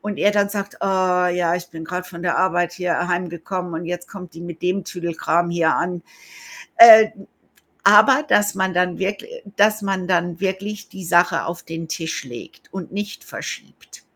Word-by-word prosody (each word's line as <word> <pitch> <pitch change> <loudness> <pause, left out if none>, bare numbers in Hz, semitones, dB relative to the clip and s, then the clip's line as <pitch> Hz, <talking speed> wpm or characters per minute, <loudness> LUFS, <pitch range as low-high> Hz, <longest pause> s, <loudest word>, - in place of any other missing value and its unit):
und 205 -1 -5
er 205 - +3
dann 205 -1 +1
sagt: 200 -1 -5
„Oh - - -1
ja, 180 -2 +1
ich 175 0 -5
bin 160 -1 -9
grad 180 +2 -5
von 170 -1 -10
der 175 -1 0
Arbeit 175 -2 +1
hier 175 0 -2
heimgekommen 175 0 -4
und 165 +1 -5
jetzt 175 +1 -6
kommt 180 -3 -11
die 165 - -11
mit 175 -1 -9
dem 185 +2 0
Tüdelkram 170 -1 -2
hier 170 -2 +1
an.“ 175 -1 -2 0.7
Äh 220 -1 +10 0.7
aber, 275 +2 +6
dass 205 -1 +2
man 190 -1 -1
dann 180 0 0
wirkl 195 - -3 0.3
dass 210 +1 +3
man 190 -2 -2
dann 175 -1 0
wirklich 200 +2 -4
die 190 - -10
Sache 175 0 +2
auf 170 +1 -6
den 165 0 -7
Tisch 160 -3 -4
legt 120 -2 -12
und 185 -2 -7
nicht 205 +1 -6
verschiebt. - - -10
180 Hz, 180 wpm, -20 LUFS, 170-195 Hz, 0.7 s, Äh